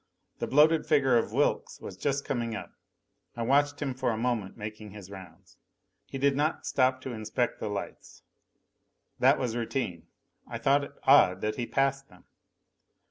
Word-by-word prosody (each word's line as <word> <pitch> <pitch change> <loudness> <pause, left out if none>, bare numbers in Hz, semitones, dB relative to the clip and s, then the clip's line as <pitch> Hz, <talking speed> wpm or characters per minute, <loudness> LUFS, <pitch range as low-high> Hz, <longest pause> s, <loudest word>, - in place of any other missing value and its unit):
The - - -2
bloated 155 +3 +4
figure 140 -5 +3
of 115 - +1
Wilks - - 0
was 95 - -8
just 140 +7 -2
coming 120 -3 -2
up. - - -7 0.6
I 120 - -3
watched 145 +3 +2
him 135 -2 -2
for 130 0 -1
a 110 - -1
moment 115 -5 -2
making 105 0 -7
his 100 -1 -11
rounds. 95 -1 -13 0.5
He - - -6
did 140 0 +2
not 150 +3 -1
stop 130 0 +1
to 130 -1 -6
inspect 115 +3 -2
the 110 - -3
lights. 105 - -7 1.0
That - - +5
was 120 -3 -2
routine. 115 - -3 0.4
I - - -5
thought 140 +1 +2
it - - -14
odd 95 -9 +5
that 105 0 -2
he 120 -2 -3
passed 135 0 0
them. 90 -2 -19
125 Hz, 170 wpm, -28 LUFS, 105-135 Hz, 1.0 s, That